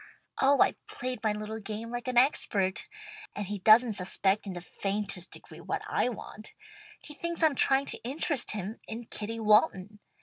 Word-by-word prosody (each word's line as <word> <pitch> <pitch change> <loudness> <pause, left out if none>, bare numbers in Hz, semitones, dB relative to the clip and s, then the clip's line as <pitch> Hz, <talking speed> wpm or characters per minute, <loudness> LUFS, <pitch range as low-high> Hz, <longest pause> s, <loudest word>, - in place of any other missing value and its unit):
Oh 275 +1 +4
I've - - +2
played 250 0 -4
my 215 - +2
little 215 +1 -5
game 220 +2 -6
like 240 +1 -5
an 250 -1 -1
expert, 205 -7 +2 0.5
and 205 - -3
he 205 +1 -4
doesn't 220 +4 +6
suspect 195 +2 0
in 190 - -4
the 175 - -7
faintest 195 0 -2
degree - - -11
what - - -3
I - - +1
want. 215 -2 -9 0.5
He 300 - -10
thinks 340 +2 -2
I'm 315 -2 +5
trying 270 +1 +4
to - - -2
interest 275 +1 -1
him 210 +1 -5
in 230 +2 -6
Kitty 225 +1 -4
Walton. 210 -1 +3
220 Hz, 175 wpm, -29 LUFS, 205-250 Hz, 0.5 s, doesn't